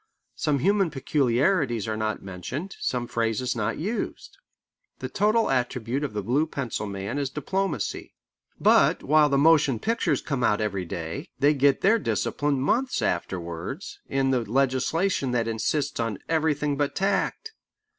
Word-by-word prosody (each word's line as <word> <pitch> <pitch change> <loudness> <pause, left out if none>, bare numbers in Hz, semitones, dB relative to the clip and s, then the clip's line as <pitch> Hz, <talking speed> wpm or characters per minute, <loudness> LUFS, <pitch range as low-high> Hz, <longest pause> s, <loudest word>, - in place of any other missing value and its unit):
Some 150 -2 +1
human 195 +5 +2
peculiarities 135 - +1
are 110 - -1
not 110 -1 -2
mentioned, 95 - -6
some 125 -1 -1
phrases 115 +1 -1
not 115 -1 -1
used. 220 - -4 0.6
The - - -5
total 215 0 +2
attribute 125 +1 -1
of 140 - -3
the 105 -1 -3
blue 140 +9 +1
pencil 125 -8 -4
man 100 +6 -4
is 140 -2 -1
diplomacy. 150 - -3 0.4
But - - +4
while 150 +1 +4
the 140 - +2
motion 145 -4 +4
pictures 230 - 0
come 135 -4 -2
out 105 -3 +3
every 100 -4 -2
day, 85 -1 -5
they 145 +2 +4
get 140 -1 +3
their 220 +4 +4
discipline 145 -8 -1
months 250 - 0
afterwards 85 - -3
in 135 -1 +1
the 130 - +2
legislation 135 - 0
that 115 -2 +1
insists 125 +6 -1
on 115 -3 -1
everything 150 -3 +1
but 145 -1 -1
tact. 200 - -1
135 Hz, 145 wpm, -26 LUFS, 115-155 Hz, 0.6 s, But